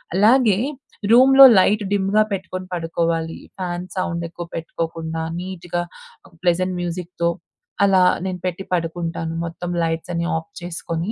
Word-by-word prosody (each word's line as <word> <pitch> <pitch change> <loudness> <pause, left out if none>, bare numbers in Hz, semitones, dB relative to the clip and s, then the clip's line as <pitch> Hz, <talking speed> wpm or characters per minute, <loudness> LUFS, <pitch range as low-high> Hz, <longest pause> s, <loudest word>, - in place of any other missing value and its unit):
అలాగే 215 0 +5 0.5
రూమ్‌లో 270 +3 +9
లైట్ 210 +2 +3
డిమ్‌గా 205 +2 +3
పెట్టుకొని 185 -1 -5
పడుకోవాలి, 165 -1 -2 0.2
ఫ్యాన్ 180 0 -4
సౌండ్ 170 -2 -2
ఎక్కువ 175 +1 -7
పెట్టుకోకుండా 165 0 -4 0.2
నీట్‌గా 175 -1 -4 0.5
ఒక 175 - -23
ప్లెజెంట్ 180 +1 +1
మ్యూజిక్‌తో 175 0 -2 0.5
అలా 195 -2 +5 0.2
నేను 185 -1 -3
పెట్టి 180 +1 -3
పడుకుంటాను. 165 -1 -2
మొత్తం 175 +1 -6
లైట్సన్ని 170 +1 -2
ఆఫ్ 160 0 -8
చేసుకొని. 170 +2 -4
175 Hz, 120 wpm, -21 LUFS, 165-190 Hz, 0.5 s, రూమ్‌లో